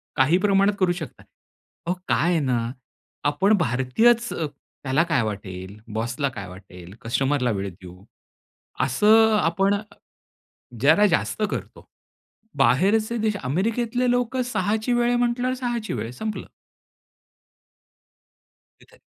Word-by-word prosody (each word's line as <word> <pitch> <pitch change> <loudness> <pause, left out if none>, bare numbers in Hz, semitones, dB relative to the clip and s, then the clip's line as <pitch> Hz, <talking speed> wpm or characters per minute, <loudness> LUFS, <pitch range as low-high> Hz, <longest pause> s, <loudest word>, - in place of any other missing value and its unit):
काही 140 +7 +4
प्रमाणात 200 +1 +3
करू 185 -2 +3
शकता. 160 -8 -8 0.6
अहो, 175 - 0
काय 170 - +2
आहे 165 - +2
ना 120 -4 -1 0.6
आपण 190 +9 +2
भारतीयच 180 - +2
"त्याला 145 -1 -3
काय 150 -7 +2
वाटेल? 100 -2 -6 0.2
बॉसला 120 +5 -2
काय 100 -7 -8
वाटेल? 90 0 -12
कस्टमरला 130 +1 0
वेळ 100 -1 -3
देऊ" 90 0 -14 0.8
असं 220 - +4
अ, - - +2
आपण 195 +4 +2 1.1
जरा 160 +9 +5
जास्त 180 +4 -1
करतो. - - -7 0.7
बाहेरचे 200 - +2
देश 215 -1 0
अमेरिकेतले 230 - 0
लोक 245 +1 0
6ची 220 0 -1
वेळ 240 0 +2
आहे 245 - +2
म्हंटल्यावर 245 +1 0
6ची 240 - -3
वेळ 115 0 -4
संपलं. 215 - -5 2.3
तिथे. - - -21
165 Hz, 115 wpm, -23 LUFS, -, 2.3 s, जरा